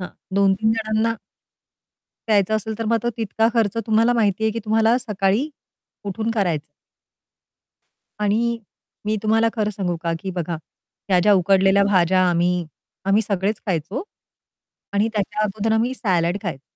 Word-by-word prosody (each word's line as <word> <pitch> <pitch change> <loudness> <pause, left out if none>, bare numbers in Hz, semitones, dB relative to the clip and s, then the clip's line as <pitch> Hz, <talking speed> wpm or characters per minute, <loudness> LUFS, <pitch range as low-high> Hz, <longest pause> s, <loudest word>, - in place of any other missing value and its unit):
हां, 180 - -5 0.3
2-3 200 +2 +3
जणांना 225 0 0 1.1
प्यायचं 210 -1 +3
असेल 220 0 -5
तर 225 - -2
मग 230 0 +3
तो 240 - 0
तितका 225 0 +1
खर्च 225 -3 +1
तुम्हाला 225 +2 +3
माहिती 220 -3 +1
आहे 220 - +3
की 230 - -3
तुम्हाला 220 +2 +3
सकाळी 210 +2 0 0.6
उठून 220 +3 -2
करायचं. 175 -9 0 1.5
आणि 230 +3 +1 0.5
मी 215 +1 0
तुम्हाला 225 +1 +3
खरं 215 -2 0
सांगू 185 -4 -2
का 170 - -1
की 190 - -4
बघा, 175 -2 -3 0.5
ह्या 185 -2 +4
ज्या 210 +2 +5
उकडलेल्या 195 +1 +4
भाज्या 185 -2 +3
आम्ही 175 0 +1 0.4
आम्ही 200 +3 +3
सगळेच 200 0 -1
खायचो 185 - -2 0.9
आणि 205 +2 +2
त्याच्या 210 0 -2
अगोदर 215 +2 -1
आम्ही 230 +3 +1
सॅलाड 180 -6 0
खायचो. 160 -9 -5
210 Hz, 145 wpm, -22 LUFS, 190-225 Hz, 1.5 s, ज्या